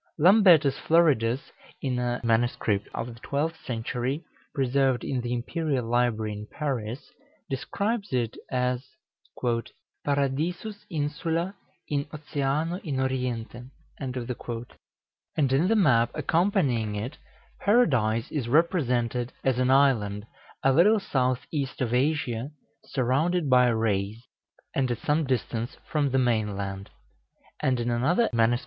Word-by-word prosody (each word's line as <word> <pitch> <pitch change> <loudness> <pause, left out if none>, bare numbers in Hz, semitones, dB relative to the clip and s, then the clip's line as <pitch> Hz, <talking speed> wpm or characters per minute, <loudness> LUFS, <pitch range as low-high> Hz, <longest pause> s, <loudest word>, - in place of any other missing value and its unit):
Lambertus 175 -5 +6
Floridus, 140 -7 +2 0.3
in 130 -3 -1
a 120 0 -1
MS. 115 +1 +2 0.4
of 115 +1 -4
the 115 - -14
twelfth 160 +3 -2
century, 125 +5 -2 0.3
preserved 135 -2 +1
in 130 -2 -1
the 120 0 -4
Imperial 130 +2 -1
Library 115 -2 +1
in 105 +1 -7
Paris, 130 -4 -4 0.4
describes 200 - -2
it 120 -4 0
as 125 0 0 1.2
"Paradisus 155 +9 -1
insula 165 +4 -1 0.3
in 145 -1 -1
oceano 150 +2 -2
in 140 -7 -2
oriente:" 125 -2 -2 0.3
and 130 -2 -4 1.3
in 140 +7 +3
the 225 - +3
map 130 - +4
accompanying 150 - +1
it, 120 +8 -5 0.4
Paradise 130 - +2
is 140 -6 -2
represented 125 -5 +1
as 130 -2 +1
an 130 0 +2
island, 115 -7 +3 0.4
a 135 - +4
little 210 +9 +5
south 130 -8 0
east 140 -3 -2
of 125 -2 -1
Asia, 130 -2 0 0.4
surrounded 140 +5 +1
by 125 -1 +6
rays, 110 -1 0 0.5
and 130 -2 +1
at 120 - -1
some 150 +6 +1
distance 120 -1 -2
from 150 -2 +2
the 135 - +1
main 110 -5 +1
land; 100 0 -5 0.7
and 130 -2 +1
in 120 0 -1
another 150 - +2
MS. 115 +1 +3
130 Hz, 120 wpm, -27 LUFS, 120-150 Hz, 1.3 s, Lambertus